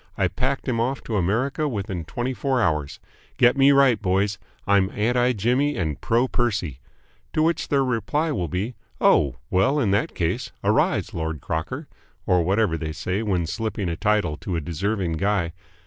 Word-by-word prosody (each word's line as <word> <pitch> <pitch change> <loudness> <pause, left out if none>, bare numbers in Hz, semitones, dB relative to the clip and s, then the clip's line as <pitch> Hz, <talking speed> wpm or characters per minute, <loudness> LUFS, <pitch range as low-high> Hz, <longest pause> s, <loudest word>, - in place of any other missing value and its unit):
I - - +2
packed 135 +2 -2
him 120 -3 0
off 130 +4 -1
to 110 - -3
America 125 - 0
within 100 - -4
twenty 120 +8 -3
four 130 +3 0
hours. 75 -9 0 0.4
Get 125 +2 +5
me 140 0 +6
right, 135 -5 +4
boys! 100 +1 +1 0.3
I'm 100 -1 +3
anti 120 +3 +2
Jimmy 125 +7 +1
and 80 -6 -2
pro 120 +3 +2
Percy." 100 - -1 0.5
To 155 - +2
which 165 0 +1
their 140 -1 +2
reply 145 +6 0
will 90 - -1
be 95 - -3 0.3
"Oh, 65 -3 +4 0.2
well, 115 +11 +3
in 110 -8 +1
that 100 - 0
case - - -1
arise, - - +1
Lord 80 -2 -3
Crocker!" 95 - -4 0.4
or 90 -1 +3
whatever 95 -2 +1
they 80 -1 -4
say 90 +5 -2
when 95 -6 0
slipping 100 +2 -3
a 85 - -2
title 105 -6 +1
to 90 - -4
a - - 0
deserving 85 +2 -2
guy. 95 -2 0
105 Hz, 175 wpm, -24 LUFS, 90-125 Hz, 0.5 s, me